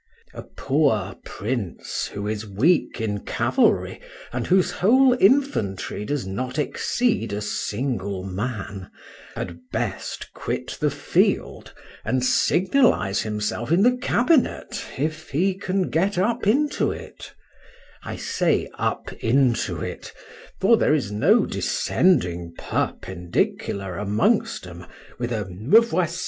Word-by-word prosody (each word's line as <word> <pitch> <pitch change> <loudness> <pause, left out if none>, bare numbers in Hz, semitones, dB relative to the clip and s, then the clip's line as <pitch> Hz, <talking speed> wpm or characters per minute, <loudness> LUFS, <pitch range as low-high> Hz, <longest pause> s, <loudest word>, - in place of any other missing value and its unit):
A - - -7
poor 110 -10 0
prince 105 -3 -4
who 100 0 -5
is 105 0 -2
weak 120 - +1
in 105 -2 -2
cavalry, - - +1 0.3
and 125 -1 -2
whose 185 0 +3
whole 250 +6 +4
infantry 110 - +1
does 145 -2 -2
not 125 +8 -4
exceed 185 - 0
a 100 - -2
single 105 -2 -3
man, 100 -1 -5 0.5
had 85 -1 -5
best - - -4
quit - - -4
the - - +2
field, - - 0 0.3
and 130 -1 0
signalize 180 - +3
himself 110 +4 -3
in 180 +4 +4
the 250 +2 +5
cabinet, 250 +3 +1
if 155 +3 -3
he 180 +7 +1
can 190 -1 -2
get 190 +4 +1
up 215 +3 0
into 290 +7 +2
it;—I - - -12
say - - 0
up - - -2
into 125 0 +2
it—for 225 +4 -2
there 155 - +3
is 125 -9 -2
no 160 - +4
descending 85 - +1
perpendicular 95 +1 -2
amongst 105 +1 +1
'em - - -10 0.3
with 120 0 -2
a 110 -3 -1
"Me 105 - +4
voici! 175 -7 -1
125 Hz, 115 wpm, -23 LUFS, -, 0.5 s, the